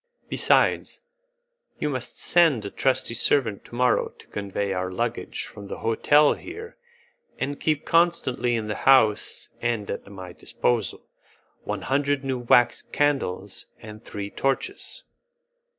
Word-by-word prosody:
Besides, - - +2 0.8
you - - -1
must 130 -4 -4
send 160 -11 +3
a 100 - -5
trusty 130 -3 0
servant 115 -3 +1
to - - -11
morrow 125 0 +2
to - - -19
convey 100 -1 -3
our 90 0 -2
luggage 90 - -3
from 100 -1 -11
the - - -6
hotel 145 +6 +4
here, 440 +6 -9 0.6
and 140 +1 -3
keep 155 -2 0
constantly 165 -8 +2
in 110 -2 -2
the 105 - -1 0.2
house 110 -6 +3
and 115 -4 -1
at - - -6
my 95 -3 -9
disposal 110 -3 -2 0.6
one - - -3
hundred 140 +1 0
new 130 -2 -2
wax 120 0 +4
candles 105 -10 -1
and 110 0 -11
three 100 0 -6
torches." 360 - -3
120 Hz, 135 wpm, -25 LUFS, 105-145 Hz, 0.8 s, hotel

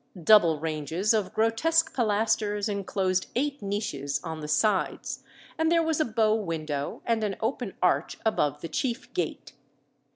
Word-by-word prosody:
Double 170 -6 +6
ranges 160 +6 -1
of 210 -4 0
grotesque 265 +10 +2
pilasters 210 -2 +1
enclosed 195 -2 -1
eight 280 +2 -1
niches 145 -9 -2
on 160 -2 -5
the 150 - -6
sides, 190 +7 0 0.4
and 320 0 +2
there 335 -1 +4
was 320 -1 0
a 310 - +3
bow 220 -1 +2
window 155 -8 -3
and 230 -2 +1
an 200 -2 -1
open 225 -2 -3
arch 180 - +1
above 150 -10 +1
the - - -4
chief 240 - -3
gate. - - -3
210 Hz, 150 wpm, -27 LUFS, 165-225 Hz, 0.4 s, Double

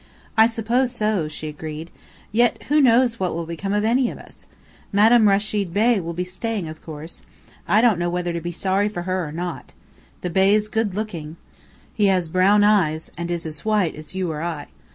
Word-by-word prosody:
"I 220 0 +7
suppose 235 +3 0
so," 215 -8 0
she 155 0 -6
agreed. 155 +2 -7 0.4
"Yet 235 +2 +2
who 300 +1 +4
knows 240 -2 +4
what 185 -3 -1
will 170 0 -3
become 170 +4 -4
of 210 +1 +1
any 245 +2 +2
of - - -8
us? - - -16 0.4
Madame 215 +2 +5
Rechid 200 -2 0
Bey 225 +1 +3
will 170 -1 -5
be 180 - -1
staying, 195 +1 -4
of 155 0 -9
course. 155 +1 -8 0.5
I 215 - +4
don't 225 -7 +3
know 175 0 0
whether 175 0 -2
to 170 - -3
be 175 +1 -4
sorry 195 +4 0
for 175 -5 -5
her 185 0 -1
or - - -7
not. 175 +1 -6 0.5
The 180 - -3
Bey's 200 +4 +3
good 215 -3 -1
looking. 170 -7 -5 0.6
He 210 -2 +2
has 185 -4 +1
brown 195 +4 +4
eyes, 170 -7 +2
and 170 0 -5
is 170 -1 -3
as 155 -2 -5
white 210 -6 +1
as 155 +3 -10
you 185 -3 -1
or 150 -1 -5
I. 165 -4 -4
190 Hz, 200 wpm, -22 LUFS, 170-215 Hz, 0.6 s, I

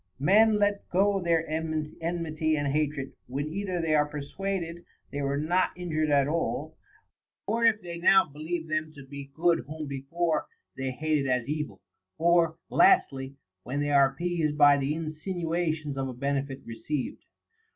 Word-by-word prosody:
Men 210 +9 +5
let 205 -1 0
go 195 +2 +2
their 165 -2 +1
enmity 155 0 -2
and 145 -1 0
hatred, 150 -2 -1
when 135 +4 -3
either 190 -2 -2
they 165 -2 +1
are 150 -1 +4
persuaded 170 +4 -4 0.3
they 145 - -3
were 140 0 0
not 175 +5 +1
injured 155 -3 -1
at 140 -1 +4
all, 165 +3 -2 0.7
or 230 +1 +1
if 220 -3 +3
they 170 -1 -6
now 190 +2 +6
believe 160 +3 -5
them 155 0 -1
to 140 -2 -11
be 140 0 -9
good 165 +3 +2
whom 155 +1 -5
before 150 +5 -1 0.3
they 135 -1 -3
hated 150 +1 0
as 125 -1 0
evil, 145 - -4 0.4
or, 165 -1 +3
lastly, 140 - +4 0.3
when 130 +8 -4
they 145 0 0
are 140 -1 +6
appeased 160 0 -1
by 145 -1 +7
the 140 +2 -1
insinuations 160 -1 -2
of 135 0 -2
a 130 - -5
benefit 140 +1 -2
received. 130 +4 -4
155 Hz, 155 wpm, -28 LUFS, 140-170 Hz, 0.7 s, by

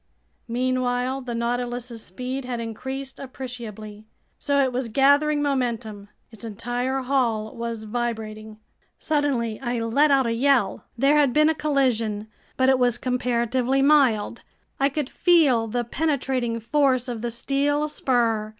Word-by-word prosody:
Meanwhile 255 +1 -1
the 245 -2 -5
Nautilus's 240 0 -3
speed 255 +7 -5
had 250 -1 -4
increased 265 +4 -6
appreciably. 225 -5 -8 0.3
So 285 0 +1
it 260 -1 -1
was 250 -1 -2
gathering 285 +4 +3
momentum. 235 -7 -2 0.2
Its 225 -2 -13
entire 245 +4 -2
hull 235 -5 0
was 230 -1 -4
vibrating. 220 -1 -4 0.4
Suddenly 275 -8 -1
I 240 -2 -2
let 230 +7 +2
out 270 -2 +4
a 230 - 0
yell. 250 -4 +1
There 275 +4 +4
had 285 -4 +3
been 305 +1 +4
a - - +3
collision, 240 -9 0 0.3
but 260 - +3
it 265 -1 +4
was 245 -1 +2
comparatively 250 +1 0
mild. 260 -7 +3 0.4
I 275 +1 +3
could 285 -1 -3
feel 285 -10 +3
the 240 +2 -1
penetrating 255 -3 -1
force 255 +1 +1
of 235 -3 -4
the 240 - -2
steel 280 +5 0
spur. 235 -7 0
245 Hz, 140 wpm, -24 LUFS, 230-275 Hz, 0.4 s, out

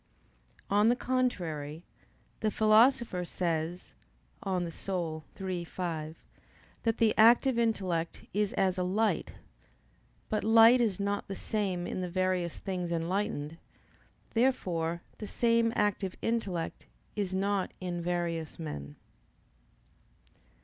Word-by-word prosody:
On 205 +3 +4
the 240 - +4
contrary, 175 - -2 0.6
The 215 - +1
Philosopher 220 -1 +4
says 170 0 -3 0.5
(De 195 - -4
Anima 175 -2 -2 0.3
iii, 180 -2 -2
5) 165 -3 -4 0.7
that 225 -1 0
the 225 -2 +4
active 235 +2 +6
intellect 185 -8 -1
is 205 0 +1
as 190 -1 +1
a - - +1
light. 210 +5 0 0.9
But 215 - -1
light 225 +3 +7
is 210 -5 +1
not 200 0 -1
the 195 - -4
same 190 -6 -2
in 185 - -3
the 180 - -3
various 185 -1 0
things 180 -3 -3
enlightened. 170 -2 -2 0.7
Therefore 175 -9 0 0.2
the 210 - -5
same 230 0 +2
active 200 -2 0
intellect 195 -8 -2 0.3
is 195 -3 -2
not 195 0 0
in 175 -2 -3
various 170 -2 -2
men. 75 - -6
185 Hz, 115 wpm, -30 LUFS, 170-220 Hz, 0.9 s, light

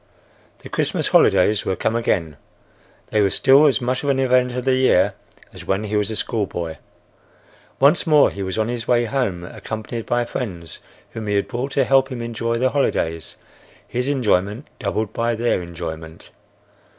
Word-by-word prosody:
The - - -9
Christmas - - -1
holidays 105 +3 +4
were 95 - -1
come 110 - -1
again. 85 -10 -1 0.7
They 105 - +2
were 100 - +3
still 135 +9 +5
as 140 - +2
much 125 +1 -1
the 145 - -2
event 125 -1 +2
of 125 +1 -4
the 130 - +3
year 130 0 +3 0.4
as - - -10
when 95 +2 0
he 105 0 -3
was 105 0 +1
a 110 - -4
schoolboy. 90 - -3 1.0
Once 145 +6 +4
more 150 -2 +5
he 100 - -7
was 95 0 -3
on 110 0 +1
his 120 -1 -4
way 120 -1 +3
home 110 -8 -2
accompanied 110 +5 -6
by 120 0 +1
friends 90 - -6 0.3
whom 110 -1 -6
he 105 - 0
had 100 - 0
brought 130 +3 -4
to 135 - +2
help 135 0 +3
him 125 - -5
enjoy 115 0 -2
the 130 +2 +1
holidays, 80 - -1 0.5
his 125 +1 -2
enjoyment 110 -3 0
doubled 105 -1 -2
by 115 0 0
their 115 -4 0
enjoyment. 85 -2 -8
115 Hz, 175 wpm, -21 LUFS, 100-125 Hz, 1.0 s, still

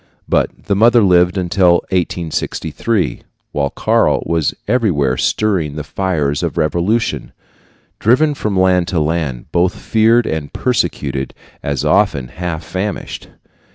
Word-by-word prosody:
But - - 0
the 100 - 0
mother 115 +2 +5
lived 90 0 +3
until 90 0 +3 0.2
1863, 85 - -2 0.3
while 70 -1 -1
Karl - - +1
was 80 -3 0
everywhere 90 - +1
stirring 90 -4 0
the 75 - -4
fires 75 -3 -1
of - - -3
revolution, 90 +9 0 0.7
driven 140 +7 +3
from 105 -8 -2
land 90 -2 +3
to 90 - 0
land, 75 -5 -2
both 90 +1 +1
feared 115 +1 +2
and 80 -2 -3
persecuted, 70 - -2 0.3
and 70 -2 -2
often 70 -12 +2
half 85 -2 -5
famished. 95 +4 -5
90 Hz, 120 wpm, -17 LUFS, 75-105 Hz, 0.7 s, mother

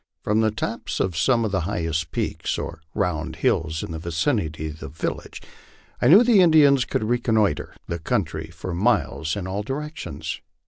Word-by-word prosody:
From 105 +1 +2
the 110 - +3
tops 110 +1 -4
of 90 -3 0
some 115 +8 +2
of 105 - -2
the 95 - +1
highest 80 -1 -1
peaks - - -2
oi' - - -3 0.2
round 80 -2 -1
hills 80 -1 0
in - - -6
the 80 - -4
vicinity 80 - -1
of 75 +1 -9
the - - -7
village 75 - -5 0.6
I - - +4
knew 190 - +8
the 230 -5 +5
Indians 145 -6 +6
could - - -1
reconnoitre 110 -7 +1
the 85 - -4
country 80 -1 -2
for 85 +2 -6
miles 85 -5 +1
in 100 -3 -4
all 95 +2 -2
directions. 150 +7 -5
95 Hz, 175 wpm, -24 LUFS, 80-120 Hz, 0.6 s, knew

